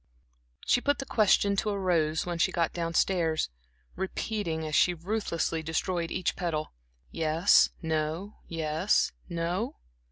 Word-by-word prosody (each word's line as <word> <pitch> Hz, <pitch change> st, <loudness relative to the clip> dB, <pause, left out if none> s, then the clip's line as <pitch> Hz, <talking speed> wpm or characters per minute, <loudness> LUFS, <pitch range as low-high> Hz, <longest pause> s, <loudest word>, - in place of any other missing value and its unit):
She 245 Hz, -, +3 dB
put 285 Hz, +2 st, +1 dB
the 270 Hz, -, -5 dB
question 205 Hz, -3 st, +3 dB
to 215 Hz, -, +1 dB
a 200 Hz, -, -1 dB
rose 165 Hz, -5 st, +1 dB
when 175 Hz, -1 st, -3 dB
she -, -, +3 dB
got 170 Hz, -2 st, 0 dB
down 165 Hz, -1 st, -3 dB
stairs, 165 Hz, -, +2 dB, 0.5 s
repeating 190 Hz, -4 st, -3 dB
as 155 Hz, -, -5 dB
she 180 Hz, +4 st, +4 dB
ruthlessly 170 Hz, -3 st, -2 dB
destroyed 165 Hz, +2 st, -1 dB
each 175 Hz, -, -1 dB
petal. 165 Hz, -4 st, -3 dB, 0.4 s
"Yes, 160 Hz, +4 st, +4 dB
no, 160 Hz, +5 st, -2 dB
yes, 160 Hz, +3 st, +1 dB, 0.2 s
no?" 175 Hz, +9 st, -2 dB
170 Hz, 135 wpm, -29 LUFS, 160-195 Hz, 0.5 s, she